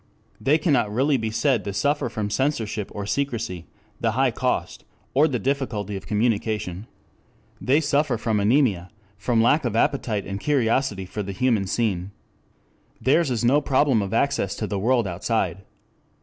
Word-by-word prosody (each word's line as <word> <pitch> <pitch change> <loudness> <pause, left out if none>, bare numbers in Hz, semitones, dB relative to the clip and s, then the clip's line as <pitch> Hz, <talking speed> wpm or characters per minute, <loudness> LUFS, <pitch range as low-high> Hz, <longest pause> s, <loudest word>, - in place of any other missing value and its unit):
They 145 +3 +3
cannot 140 - +1
really 135 +5 +2
be 110 -2 -2
said 115 +1 +1
to 100 - -4
suffer 145 +3 0
from 105 -2 -3
censorship, 110 -4 -1
or 100 -1 -5
secrecy, 110 - -3 0.3
the 115 -1 0
high 130 +1 +2
cost 125 +2 -2 0.3
or 145 +4 +5
the 135 -5 -1
difficulty 115 -5 -2
of 95 - -7
communication. 105 -3 -1 0.7
They 140 +5 +3
suffer 145 -4 +1
from 110 -1 0
anemia, 105 -5 +2 0.3
from 115 +2 +2
lack 145 +7 +3
of 120 -4 -2
appetite 115 -5 0
and 100 0 -5
curiosity 115 -6 0
for 105 +3 -5
the 100 -1 -5
human 110 -2 +1
scene. 100 -4 -1 0.9
Theirs 145 +3 +2
is 120 -2 -1
no 140 +5 +4
problem 135 -4 +2
of 100 -1 -4
access 115 -5 0
to 110 - -3
the 100 -2 -3
world 120 +2 +2
outside. 100 +3 -1
115 Hz, 160 wpm, -24 LUFS, 105-135 Hz, 0.9 s, or